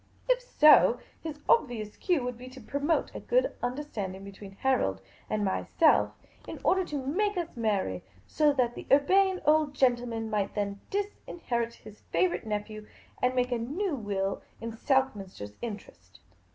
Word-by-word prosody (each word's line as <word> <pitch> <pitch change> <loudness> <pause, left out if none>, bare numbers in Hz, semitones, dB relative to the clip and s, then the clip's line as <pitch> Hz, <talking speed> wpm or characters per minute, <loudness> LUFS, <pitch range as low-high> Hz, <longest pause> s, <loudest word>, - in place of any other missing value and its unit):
If - - +3
so, 305 -11 +6 0.2
his 310 -2 -6
obvious 230 - +2
cue 350 -9 0
would 250 0 -3
be 250 +2 -10
to 260 +1 -12
promote 285 +7 -1
a - - -5
good - - +1
understanding 245 -8 -4
between 200 0 -10
Harold 195 - +1 0.3
and 210 -1 0
myself, 305 - +2 0.3
in - - -7
order 375 0 +3
to 285 -5 -4
make 410 +8 0
us 340 -4 -3
marry, 200 - -1 0.2
so 300 -1 +3
that 250 -4 +1
the - - -9
Urbane 375 +7 +4
Old 300 -1 +3
Gentleman 240 -4 +1
might 205 -2 -1
then 200 -1 -2
disinherit 295 - -3
his 215 0 -14
favourite 175 +4 +1
nephew, 215 0 -4 0.3
and 250 0 +2
make 250 0 +1
a 240 - 0
new 315 - -2
will 200 -4 -2 0.2
in 230 0 -5
Lord 225 - -12
SoLLliiJ,' 265 -8 +1
oter's 100 0 -7
interest. 95 - -8
245 Hz, 160 wpm, -29 LUFS, 205-300 Hz, 0.3 s, so